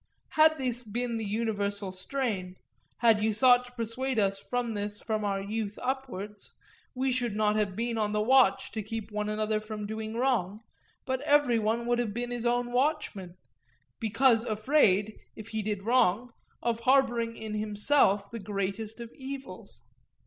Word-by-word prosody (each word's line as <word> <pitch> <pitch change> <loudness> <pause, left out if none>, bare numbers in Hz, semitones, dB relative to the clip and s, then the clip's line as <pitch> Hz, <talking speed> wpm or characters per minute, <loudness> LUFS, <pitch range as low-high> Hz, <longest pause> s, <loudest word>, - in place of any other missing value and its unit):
Had 315 0 +5
this 250 -3 -1
been 235 +1 -3
the 220 - -3
universal 205 -2 -1
strain, 190 -2 -3 0.5
had 225 -3 +5
you 215 0 +2
sought 250 +2 +5
to 245 - -14
persuade 245 +2 -3
us 195 -2 +1
of 245 -2 0
this 205 0 -4
from 215 -1 -2
our 200 -1 0
youth 210 +1 -4
upwards, 235 -6 -5 0.4
we 260 +1 0
should 245 -4 -1
not 210 0 +2
have 205 -3 0
been 230 +1 -1
on 210 -1 0
the 210 - 0
watch 235 -2 +4
to 220 - -3
keep 220 +1 -6
one 210 0 -2
another 215 0 0
from 215 -1 -6
doing 220 +1 -5
wrong, 225 -5 0 0.4
but 260 0 -1
every 290 -5 +3
one 225 +2 0
would 240 0 +1
have 220 -4 -2
been 245 0 -3
his 240 -1 -2
own 245 0 0
watchman, 245 - -1 0.6
because 230 +1 +3
afraid, 215 -3 +2 0.2
if 215 0 -10
he 220 -1 -2
did 205 -2 -3
wrong, 240 0 +2 0.3
of 235 -1 0
harbouring 235 -2 +2
in 220 -1 -6
himself 210 0 +2
the 230 - -5
greatest 205 +2 -3
of 235 -1 -8
evils. 270 0 -8
225 Hz, 165 wpm, -29 LUFS, 210-245 Hz, 0.6 s, Had